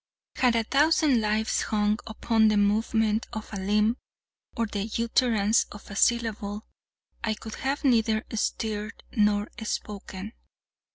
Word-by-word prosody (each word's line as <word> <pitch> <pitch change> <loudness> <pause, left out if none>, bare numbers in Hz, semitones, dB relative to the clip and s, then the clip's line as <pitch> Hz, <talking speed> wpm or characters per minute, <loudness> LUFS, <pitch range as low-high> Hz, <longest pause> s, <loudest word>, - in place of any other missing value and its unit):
Had 250 -2 +3
a 230 - +2
thousand 285 0 +3
lives 215 +1 0
hung 210 0 +1
upon 220 0 +2
the 215 -1 +3
movement 215 +2 +1
of 220 -1 -7
a - - -3
limb 210 +4 +2 0.6
or 230 - +1
the 210 0 -4
utterance 230 -2 +2
of 205 0 -11
a - - -7
syllable, 215 -2 0 0.6
I 220 -2 0
could 220 +1 -9
have 275 +3 -2
neither 225 -4 +2
stirred 215 -1 -3
nor 210 -2 +2
spoken. 205 -1 -5
220 Hz, 130 wpm, -27 LUFS, 210-230 Hz, 0.6 s, Had